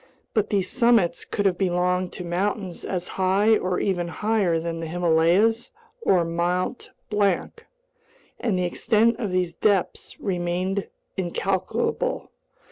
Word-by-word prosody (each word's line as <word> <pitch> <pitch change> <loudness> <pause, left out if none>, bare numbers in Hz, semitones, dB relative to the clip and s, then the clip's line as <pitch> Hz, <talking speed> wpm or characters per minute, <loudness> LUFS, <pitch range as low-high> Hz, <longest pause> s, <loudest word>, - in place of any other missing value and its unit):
But 215 -3 +1
these 195 -3 +1
summits 235 -6 +3
could 205 - -2
have 185 -2 +2
belonged 180 -1 +1
to 180 - -6
mountains 185 +1 -2
as 180 -2 -3
high 200 +4 +4
or 185 -3 -1
even 175 -3 0
higher 200 -1 +1
than 165 0 -3
the 165 - -4
Himalayas 175 +7 +2 0.3
or 180 - +3
Mt. 175 +7 -1 0.2
Blanc, 200 -3 0 0.7
and 210 -6 0
the 180 - 0
extent 220 +6 +2
of 215 -5 -2
these 180 -2 0
depths 195 +1 0
remained 185 +1 -1 0.3
incalculable. 190 - -1
185 Hz, 125 wpm, -24 LUFS, 175-205 Hz, 0.7 s, high